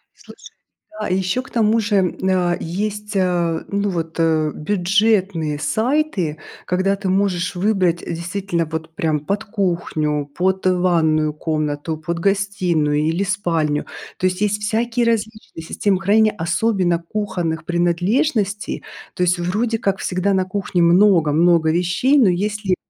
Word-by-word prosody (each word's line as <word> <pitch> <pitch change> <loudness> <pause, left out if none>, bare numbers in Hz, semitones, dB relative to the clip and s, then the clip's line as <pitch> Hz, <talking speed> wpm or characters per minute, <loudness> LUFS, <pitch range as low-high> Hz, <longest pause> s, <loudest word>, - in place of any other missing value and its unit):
Слушай, - - -15 0.5
да, 215 - -2
а - - -4
ещё 190 +6 0
к 265 - -15
тому 225 -1 +2
же, 210 -1 0
м, 185 -2 +1
а, 175 -2 +2
есть, 210 +4 -4
а, 175 -3 0
ну 200 0 -1
вот, 165 -3 -4
э, 160 -2 +2
бюджетные 190 -3 +1
сайты, 220 - 0 0.3
когда 190 +2 +1
ты 195 -1 -3
можешь 185 -2 0
выбрать, 185 -3 +1
э, - - -5
действительно 175 0 -2
вот 160 +1 -6
прям 155 -3 0
под 195 +8 -2
кухню, 170 -7 -1
под 190 +1 0
ванную 165 -4 +2
комнату, 155 0 -2
под 170 +2 -4
гостиную 180 -6 +1
или 165 +5 0
спальню. 165 -7 -1 0.3
То - - -2
есть 185 +2 -3
есть 210 0 0
всякие 230 +3 0
различные 220 -6 -3
системы 190 +3 0
хранения, 215 +2 +3
особенно 180 0 +1
кухонных 175 -4 -3
принадлежностей. 200 - 0 0.3
То 180 - 0
есть 180 0 +2
вроде 215 +7 0
как 195 -1 -1
всегда 185 +2 0
на 190 -1 +1
кухне 185 -2 -1
много-много 170 -3 +4
вещей, 180 - +2
но 225 -8 +5
если 200 +1 -1
185 Hz, 140 wpm, -20 LUFS, 165-205 Hz, 0.5 s, но